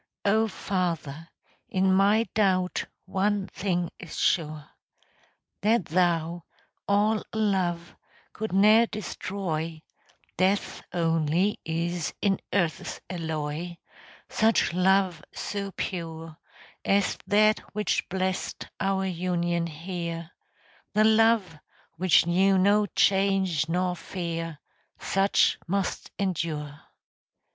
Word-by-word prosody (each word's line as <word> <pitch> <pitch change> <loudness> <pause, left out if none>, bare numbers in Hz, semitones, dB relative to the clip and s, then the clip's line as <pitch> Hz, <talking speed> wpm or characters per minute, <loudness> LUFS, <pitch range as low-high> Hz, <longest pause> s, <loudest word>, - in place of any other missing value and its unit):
O 220 +2 +3
Father, 170 -6 -3 0.4
in 190 0 +2
my 205 +4 +4
doubt 185 -4 +1 0.2
One 195 +1 0
thing 180 -4 -2
is 175 - -8
sure, 155 -3 0 0.9
That 215 0 +2
Thou, 170 0 +1 0.4
all 210 +2 +2
love, 185 -5 0 0.4
could 220 0 -4
ne'er 215 +4 +6
destroy 165 -6 -4 0.5
(Death 190 +2 +1
only 165 +3 +1
is 170 +1 -2
in 195 -2 +1
earth's 170 -5 -1
alloy) 160 0 -4 0.5
Such 220 -5 +2
love 185 -2 +2
so 200 -1 -3
pure 165 -3 -5 0.5
As 200 -1 +1
that 215 +1 +4 0.2
which 210 0 0
blessed 185 0 -2
our 195 0 0
union 175 -1 -1
here, 170 0 -5 0.6
The 210 +1 +4
love 220 -6 +3 0.4
which 180 -1 +4
knew 190 +3 +3
no 205 +2 +4
change 190 -6 +2
nor 180 +1 0
fear 165 -2 -5 0.4
Such 195 +1 +2
must 195 +1 -2
endure. 155 -6 -3
185 Hz, 95 wpm, -27 LUFS, 165-200 Hz, 0.9 s, ne'er